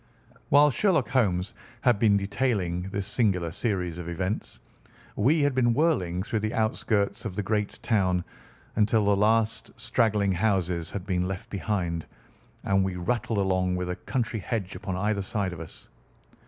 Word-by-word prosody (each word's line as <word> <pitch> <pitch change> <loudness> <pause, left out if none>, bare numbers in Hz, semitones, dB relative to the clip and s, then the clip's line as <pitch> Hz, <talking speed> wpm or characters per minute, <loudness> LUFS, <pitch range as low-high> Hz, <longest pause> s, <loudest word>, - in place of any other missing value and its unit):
While 145 +1 +6
Sherlock 160 - +2
Holmes 95 -7 +1 0.3
had 120 -5 +3
been 105 -2 +4
detailing 100 -4 -1
this 100 0 -3
singular 95 -7 +1
series 90 -4 -2
of 85 -1 -5
events, 95 +4 -3 0.6
we 150 +9 +3
had 145 -1 +2
been 120 -2 +2
whirling 95 - +1
through 110 +1 -1
the 110 +1 -2
outskirts 110 -2 0
of 105 -5 -5
the 105 - -1
great 105 0 -1
town 90 -5 +2 0.5
until 110 0 +3
the 100 0 +4
last 110 +2 +2
straggling 105 -4 +1
houses 90 -4 0
had 95 -3 -5
been 90 -2 0
left 100 +5 -6
behind, 95 -5 -2 0.6
and 95 0 +2
we 95 -1 -2
rattled 115 +5 -1
along 95 -2 +1
with 90 0 -2
a - - -3
country 115 0 -2
hedge 100 -3 -3
upon 95 0 -4
either 105 +1 0
side 95 -1 -2
of 85 - -8
us. 80 - -9
100 Hz, 160 wpm, -27 LUFS, 90-115 Hz, 0.6 s, While